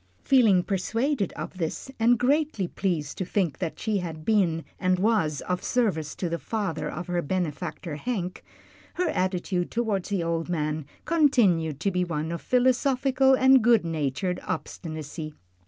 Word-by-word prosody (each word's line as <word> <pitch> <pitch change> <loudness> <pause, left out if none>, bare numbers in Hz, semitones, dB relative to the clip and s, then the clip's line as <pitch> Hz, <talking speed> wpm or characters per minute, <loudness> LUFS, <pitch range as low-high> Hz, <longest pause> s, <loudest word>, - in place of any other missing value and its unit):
Feeling 220 -9 +5
persuaded 220 - -1
of 185 - -7
this, 165 +10 -3
and 235 +2 +4
greatly 270 - +1
pleased 170 -7 -2
to - - 0
think 180 -4 -1
that 170 -4 -4
she 215 -2 0
had 160 -3 -6
been 180 -7 +2
and 185 0 +2
was 185 -7 +1
of 180 0 -3
service 190 - 0
to 180 - -2
the 170 0 -2
father 165 -9 -3
of 175 +3 -5
her 175 -1 -1
benefactor 170 -1 -3
Hank, 185 -3 -3 0.5
her 360 -2 0
attitude 185 - -1
toward 220 -6 -1
the 195 -4 -1
old 165 0 -2
man 155 -3 -2 0.2
continued 205 - +3
to 200 - +1
be 180 0 +1
one 160 -2 -3
of 170 - -4
philosophical 260 +1 +3
and 260 -1 +5
good 230 -5 +4
natured 160 +3 -1
obstinacy. 155 -1 -5
185 Hz, 155 wpm, -26 LUFS, 165-230 Hz, 0.5 s, Feeling